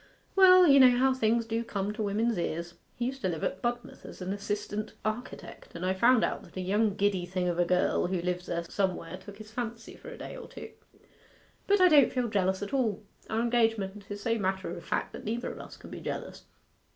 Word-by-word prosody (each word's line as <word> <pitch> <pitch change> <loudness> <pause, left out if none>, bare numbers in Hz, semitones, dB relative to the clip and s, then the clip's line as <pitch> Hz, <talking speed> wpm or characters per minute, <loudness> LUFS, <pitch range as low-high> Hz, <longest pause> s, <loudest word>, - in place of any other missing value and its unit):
'Well, 370 -1 +8
you 280 -4 +7
know 250 -2 +7
how 265 +1 +4
things 230 -2 +1
do 225 +1 -2
come 205 -2 -3
to 215 - -5
women's 220 +3 0
ears. 170 0 -3 0.2
He 240 - -2
used 265 +2 -4
to 190 - 0
live 165 -3 -4
at 185 - -2
Budmouth 240 +3 -4
as - - -10
an 185 +1 -3
assistant 205 +1 -4
architect, 215 +3 -6
and 170 +2 -4
I 185 - +2
found 235 +5 +4
out - - -1
that - - -14
a - - -2
young 205 +2 +1
giddy 200 -3 +1
thing 180 0 -1
of 175 0 -1
a 175 - +4
girl 180 0 +2
who 185 0 -1
lives 180 +1 -3
there 170 0 -2
somewhere 185 -2 -2
took 205 -1 -12
his 215 0 -11
fancy 230 0 -5
for 485 - -11
a 485 - -9
day - - -8
or - - -9
two. - - -10 1.0
But 405 -1 +4
I 365 - +8
don't 295 -6 +6
feel 250 -2 -1
jealous 190 -2 0
at 205 - -6
all 225 -7 0 0.3
our 220 +1 0
engagement 225 -4 0
is 205 0 -6
so 230 0 0
matter 190 -2 -2
of 170 - -9
fact - - -2
that - - -8
neither 230 +3 -3
of - - -10
us - - -10
can - - -13
be - - -7
jealous. - - -6
215 Hz, 230 wpm, -29 LUFS, 190-240 Hz, 1.0 s, Well